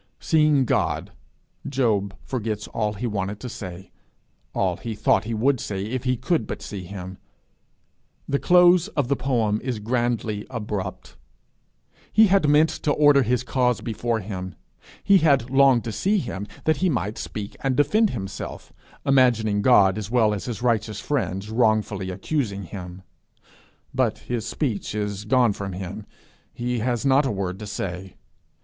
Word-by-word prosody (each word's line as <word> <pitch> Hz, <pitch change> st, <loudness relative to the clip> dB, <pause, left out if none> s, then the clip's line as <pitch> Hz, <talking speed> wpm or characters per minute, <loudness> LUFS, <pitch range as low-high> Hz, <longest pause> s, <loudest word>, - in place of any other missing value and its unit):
Seeing 150 Hz, -4 st, +3 dB
God, -, -, 0 dB, 0.6 s
Job 110 Hz, -8 st, 0 dB
forgets 110 Hz, -4 st, -3 dB
all 105 Hz, -2 st, -1 dB
he 105 Hz, +4 st, -5 dB
wanted 100 Hz, -2 st, -3 dB
to 125 Hz, -, -5 dB
say, 95 Hz, -5 st, -8 dB, 0.6 s
all -, -, 0 dB
he 115 Hz, -2 st, -5 dB
thought 105 Hz, 0 st, +2 dB
he 115 Hz, 0 st, -2 dB
would 130 Hz, +4 st, +2 dB
say 100 Hz, -2 st, -4 dB
if 125 Hz, +3 st, -4 dB
he 125 Hz, -1 st, +1 dB
could 130 Hz, -1 st, 0 dB
but -, -, -6 dB
see 95 Hz, -1 st, -6 dB
him. 95 Hz, 0 st, -8 dB, 1.1 s
The 140 Hz, -, 0 dB
close 180 Hz, 0 st, +5 dB
of 135 Hz, -4 st, +1 dB
the 140 Hz, -, +3 dB
poem 115 Hz, -6 st, 0 dB
is 125 Hz, -3 st, -2 dB
grandly 115 Hz, -2 st, -1 dB
abrupt. 105 Hz, -6 st, -5 dB, 0.9 s
He 220 Hz, +1 st, +6 dB
had 190 Hz, -6 st, +3 dB
meant 150 Hz, +2 st, +5 dB
to 150 Hz, -, +1 dB
order 145 Hz, -2 st, +5 dB
his 125 Hz, 0 st, +1 dB
cause 125 Hz, -1 st, +1 dB
before 115 Hz, 0 st, -2 dB
him; 95 Hz, -2 st, -6 dB, 0.5 s
he 200 Hz, -1 st, +6 dB
had 140 Hz, -7 st, +2 dB
longed 135 Hz, -3 st, +5 dB
to 115 Hz, -, -4 dB
see 195 Hz, -, +1 dB
him 105 Hz, -, -4 dB, 0.2 s
that 155 Hz, -2 st, +2 dB
he 185 Hz, +3 st, +1 dB
might 110 Hz, -, -2 dB
speak 105 Hz, -1 st, -6 dB
and 135 Hz, -2 st, 0 dB
defend 205 Hz, +10 st, +3 dB
himself, 95 Hz, -, -6 dB, 0.3 s
imagining 120 Hz, -6 st, +3 dB
God 100 Hz, -4 st, +5 dB
as 105 Hz, -1 st, -6 dB
well 110 Hz, -3 st, +3 dB
as 100 Hz, -, -4 dB
his 120 Hz, -2 st, -5 dB
righteous 110 Hz, -3 st, 0 dB
friends 105 Hz, -8 st, -2 dB
wrongfully 110 Hz, -4 st, +1 dB
accusing 100 Hz, +1 st, -2 dB
him; 90 Hz, 0 st, -8 dB, 0.9 s
but -, -, +1 dB
his 120 Hz, -3 st, -4 dB
speech 115 Hz, -8 st, -2 dB
is 105 Hz, -1 st, -3 dB
gone 120 Hz, -1 st, +3 dB
from 100 Hz, -1 st, -5 dB
him; 100 Hz, +3 st, -7 dB, 0.5 s
he 120 Hz, 0 st, -2 dB
has 120 Hz, +3 st, -1 dB
not 135 Hz, +1 st, +4 dB
a -, -, -1 dB
word 95 Hz, -2 st, -3 dB
to 105 Hz, -, -7 dB
say. 95 Hz, -2 st, -5 dB
115 Hz, 160 wpm, -24 LUFS, 100-130 Hz, 1.1 s, He